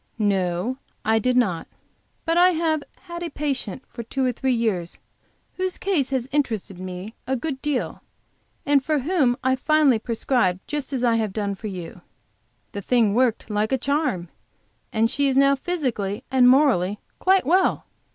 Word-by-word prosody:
"No, 195 +2 0 0.3
I 220 +1 +3
did 250 +3 +1
not. 185 -9 +1 0.6
But 330 - +1
I 360 +1 +6
have 320 -2 0 0.2
had 345 -2 -8
a 345 - -3
patient 275 - -3
for 235 - -8
two 260 +3 -2
or 250 - +2
three 260 +2 -1
years 215 -8 -1 0.6
whose 370 0 -2
case 340 -9 0
has 260 -2 -1
interested 225 -10 -1
me 185 +3 -7
a 265 - +1
good 265 +1 -4
deal, 295 -4 -2 0.6
and 285 -1 +3
for 305 +2 +1
whom 275 -4 +1
I 260 0 +3
finally 290 -3 +3
prescribed 225 -5 0
just 295 -2 -4
as 260 -3 -2
I 235 -2 +3
have 215 -4 -1
done 205 -1 -1
for 205 +2 -7
you. 180 -4 -7 0.7
The 200 - -5
thing 225 -1 +2
worked 235 -2 +1
like 210 +2 0
a 265 - +3
charm, 260 - -1 0.6
and 225 +1 +2
she 280 +4 +1
is 265 -1 +1
now 275 0 +5
physically 255 - -2
and 255 -2 +6
morally 240 -8 +3 0.2
quite 380 -4 +3
well. 365 +6 +2
255 Hz, 170 wpm, -23 LUFS, 215-290 Hz, 0.7 s, I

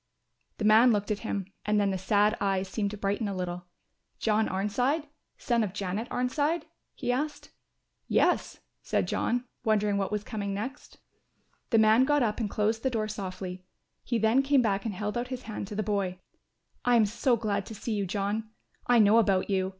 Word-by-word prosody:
The 215 - -2
man 220 +3 +7
looked 205 0 0
at 210 - -1
him 200 -4 -3 0.2
and 210 0 +2
then 200 -1 +2
the 190 - -1
sad 205 +3 +3
eyes 195 -1 0
seemed 200 +1 -2
to 210 - -7
brighten 205 +2 -1
a 200 - -3
little. 180 -1 -4 0.5
"John 220 0 +1
Arnside, 245 - 0 0.3
son 235 -2 +1
of 195 -4 -3
Janet 205 +4 -3
Arnside?" 290 +6 0 0.3
he - - -1
asked. 295 +4 -3 0.6
"Yes," - - +1 0.2
said - - 0
John, 245 +1 0 0.2
wondering 210 -3 +2
what 195 - -2
was 210 -1 -1
coming 200 -3 -4
next. 255 +8 -6 0.7
The 230 - +3
man 220 +3 +5
got 290 -1 +3
up 215 -1 -1
and 220 -3 -1
closed 220 +2 0
the 265 - +1
door 220 -3 -1
softly, 185 -3 -6 0.4
he 240 - -1
then 225 +4 +3
came 275 -1 +3
back 200 -2 0
and 215 -4 -3
held 210 +4 -2
out 245 - -3
his 255 -1 -6
hand 215 -3 -5
to 205 - -7
the 215 - -1
boy. 195 -3 -1 0.7
"I 245 0 +4
am 225 -2 +5
so 235 +4 +1
glad 210 -2 -2
to 220 - -8
see 225 +2 -4
you, 200 -2 -1
John; 205 +3 -2 0.4
I 245 - +5
know 215 +1 +6
about 200 -3 +2
you. 190 -1 +1
215 Hz, 195 wpm, -28 LUFS, 200-235 Hz, 0.7 s, man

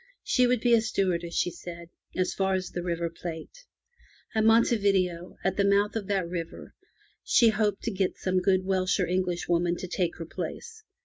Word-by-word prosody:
She 250 -1 +3
would 245 -2 +1
be 240 -1 +3
a 230 - +6
stewardess, 175 -5 -1
she 175 - +1
said, 170 0 -9 0.3
as 185 0 0
far 190 -1 +1
as 185 -1 -3
the 175 - -4
River 170 -1 -2
Plate. 170 - -8 0.7
At 220 - +2
Monte 225 +2 +5
Video, 185 -4 0
at 190 0 0
the 200 - +3
mouth 200 +2 +2
of 210 -4 -3
that 195 -4 0
river, 170 -1 -6 0.5
she 235 -2 +5
hoped 210 -2 0
to 230 - -1
get 190 -2 -1
some 185 0 0
good 185 0 +2
Welsh 185 0 +1
or 185 - +2
English 180 -1 -1
woman 175 0 +1
to 185 - -6
take 175 -1 -1
her 165 - -6
place. 445 - -7
185 Hz, 195 wpm, -27 LUFS, 175-205 Hz, 0.7 s, a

